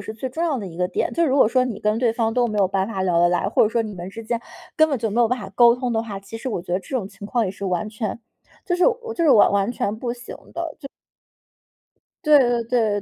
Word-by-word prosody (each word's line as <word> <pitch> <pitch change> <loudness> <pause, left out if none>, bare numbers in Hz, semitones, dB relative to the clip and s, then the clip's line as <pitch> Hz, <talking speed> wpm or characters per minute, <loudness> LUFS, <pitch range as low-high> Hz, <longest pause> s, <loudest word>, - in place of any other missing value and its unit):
是 220 - -7
最 245 +4 -4
重 320 +6 -3
要 305 -6 0
的 205 - -5
一 165 -3 -10
个 180 - +1
点。 - - -1
就 335 - +2
如 270 -1 +1
果 265 - +5
说 255 +2 +2
你 235 -5 -4
跟 215 0 +1
对 235 -2 +2
方 225 -1 0
都 245 +1 +2
没 215 -2 -4
有 195 - +4
办 190 0 0
法 195 -3 -3
聊 180 -2 +2
得 175 0 +5
来， 180 +2 0
或 - - +3
者 215 - +4
说 230 +1 0
你 215 -2 -6
们 175 0 -7
之 225 +4 -8
间 235 +1 -2 0.4
根 315 0 +5
本 275 -4 -1
就 225 -1 -2
没 230 +4 +1
有 235 - +4
办 250 +2 0
法 195 -3 -8
沟 235 +1 +6
通 250 -1 -3
的 225 -1 0
话， 210 -4 -6
其 210 +3 -9
实 260 - -4
我 205 -8 -3
觉 175 - -6
得 180 - +2
这 225 +8 -4
种 200 -6 -3
情 200 - -10
况 235 +2 0
也 190 - -2
是 200 +1 -8
完 185 +3 -1
全， 215 +1 -4 0.5
就 355 - 0
是 355 - +4
我 470 -1 -1
就 350 - -2
是 310 - +5
我 215 - +6
完 200 +2 +1
全 210 -4 -2
不 240 0 -3
行 240 0 -9 0.2
的。 335 -3 -4
就 275 - -8 1.4
对 300 -1 +7
对 240 -2 +2
对 225 -3 0
225 Hz, 325 characters per minute, -22 LUFS, 200-250 Hz, 1.4 s, 对